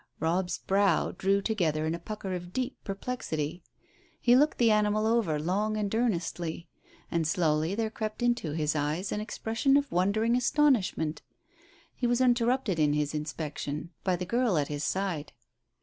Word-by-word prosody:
Robb's 175 +3 0
brows 195 -2 +2
drew 195 +1 +2
together 165 -9 0
in 160 - 0
a 170 - -4
pucker 195 +1 -5
of 175 -1 -5
deep 255 +5 -2
perplexity. 185 -7 -4 0.6
He 245 0 +5
looked 295 +4 +3
the 230 -2 +4
animal 210 0 +2
over 220 -9 +2
long 205 +7 0
and 205 -1 -2
earnestly, 175 -7 -1 0.4
and 165 -2 +1
slowly 160 +1 +1
there 220 0 -1
crept 215 +1 -4
into 240 -11 +1
his 155 -1 0
eyes 150 +6 -1
an 210 - -1
expression 225 +5 +1
of 285 0 -1
wondering 210 +6 +2
astonishment. 245 - +2 0.7
He 245 - -1
was 240 0 +2
interrupted 245 -6 +2
in 150 -1 +3
his 150 -1 0
inspection 150 0 -4
by 185 -2 +2
the 180 +1 -4
girl 235 -2 +1
at 145 -2 0
his 145 0 -3
side. 185 -6 -2
190 Hz, 160 wpm, -29 LUFS, 160-230 Hz, 0.7 s, He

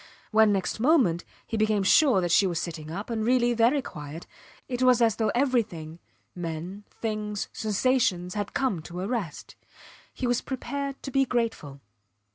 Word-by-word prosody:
When, 220 -1 +5
next 195 +1 -1
moment, 240 - +3 0.2
he 225 - -3
became 215 -2 +2
sure 250 0 +5
that 175 -1 -1
she 195 - +5
was 170 -2 -1
sitting 160 -3 -5
up, 200 +8 -5
and 220 -1 -1
really 240 +1 +3
very 240 +5 +3
quiet, 150 -1 -8 0.4
it 250 -1 -3
was 255 -1 +5
as 225 -4 +3
though 220 - +1
everything 215 - 0 0.3
men, 175 +4 -6 0.2
things, 210 -2 -3
sensations, 210 -5 +1
had 205 -1 -4
come 235 -11 0
to 175 +3 -7
a 190 - -2
rest. 215 -9 -4 0.6
He 260 - -4
was 245 -1 +1
prepared 275 +1 -5
to 270 - -5
be 270 +1 +3
grateful. 230 - -2
215 Hz, 165 wpm, -27 LUFS, 175-245 Hz, 0.6 s, When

